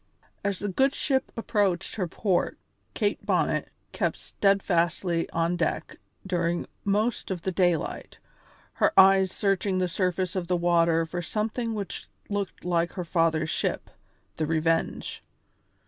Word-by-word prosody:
As 200 Hz, -2 st, 0 dB
the 205 Hz, -, -3 dB
good 265 Hz, +8 st, +2 dB
ship 265 Hz, -3 st, 0 dB
approached 200 Hz, -5 st, 0 dB
her 190 Hz, -5 st, -2 dB
port 185 Hz, +2 st, 0 dB, 0.4 s
Kate 205 Hz, -2 st, 0 dB
Bonnet -, -, +1 dB, 0.2 s
kept -, -, -1 dB
steadfastly 175 Hz, -3 st, +1 dB
on 170 Hz, +1 st, 0 dB
deck 170 Hz, -2 st, -2 dB, 0.3 s
during 175 Hz, -2 st, 0 dB, 0.2 s
most 210 Hz, +3 st, 0 dB
of 180 Hz, -3 st, -3 dB
the 190 Hz, -, -1 dB
daylight, 175 Hz, -3 st, 0 dB, 0.6 s
her -, -, +5 dB
eyes 190 Hz, -1 st, +6 dB
searching 195 Hz, -1 st, 0 dB
the 185 Hz, -1 st, +1 dB
surface 180 Hz, 0 st, -1 dB
of 180 Hz, -2 st, -2 dB
the 180 Hz, 0 st, +1 dB
water 170 Hz, -1 st, +3 dB
for 175 Hz, +2 st, -4 dB
something 225 Hz, +5 st, -2 dB
which 200 Hz, -3 st, -5 dB, 0.2 s
looked 200 Hz, -4 st, -3 dB
like 170 Hz, -1 st, +1 dB
her 180 Hz, -3 st, -4 dB
father's 160 Hz, -2 st, +1 dB
ship, -, -, -2 dB, 0.5 s
the 155 Hz, -, 0 dB
Revenge. 165 Hz, +1 st, 0 dB
180 Hz, 135 wpm, -27 LUFS, 170-200 Hz, 0.6 s, eyes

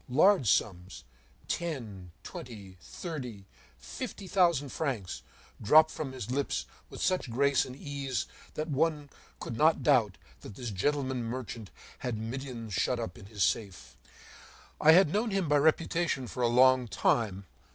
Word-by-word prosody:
Large 150 Hz, -, +4 dB
sums, 95 Hz, -3 st, 0 dB, 0.4 s
ten, 115 Hz, -, -4 dB
twenty, 100 Hz, -6 st, -9 dB
thirty, 125 Hz, -, -7 dB, 0.3 s
fifty 60 Hz, -, -7 dB
thousand 170 Hz, -7 st, +2 dB
francs, 115 Hz, -, -3 dB, 0.4 s
dropped 155 Hz, +8 st, +6 dB
from 145 Hz, -4 st, -5 dB
his 125 Hz, -3 st, -6 dB
lips 135 Hz, -, -1 dB, 0.2 s
with -, -, -6 dB
such 185 Hz, -8 st, 0 dB
grace 140 Hz, +3 st, +2 dB
and 130 Hz, -, -9 dB
ease 140 Hz, -2 st, -3 dB, 0.3 s
that 155 Hz, +1 st, -3 dB
one 150 Hz, -1 st, 0 dB, 0.3 s
could 120 Hz, -, -5 dB
not 155 Hz, +4 st, +3 dB
doubt 115 Hz, -10 st, +3 dB, 0.2 s
that 95 Hz, -, -11 dB
this 120 Hz, -1 st, -5 dB
gentleman 130 Hz, +4 st, -1 dB
merchant 115 Hz, -3 st, -6 dB, 0.3 s
had 125 Hz, -3 st, -3 dB
millions 115 Hz, -1 st, -6 dB
shut 125 Hz, +4 st, 0 dB
up 105 Hz, -6 st, -5 dB
in 100 Hz, -, -12 dB
his 100 Hz, -2 st, -1 dB
safe. 80 Hz, -, -2 dB, 0.9 s
I 160 Hz, +1 st, +8 dB
had 175 Hz, -3 st, +5 dB
known 220 Hz, +3 st, +1 dB
him 195 Hz, -4 st, 0 dB
by 145 Hz, 0 st, +4 dB
reputation 160 Hz, -1 st, +1 dB
for 125 Hz, +1 st, -6 dB
a 120 Hz, -, +4 dB
long 130 Hz, +1 st, +5 dB
time. 100 Hz, -3 st, 0 dB
130 Hz, 145 wpm, -30 LUFS, 110-150 Hz, 0.9 s, I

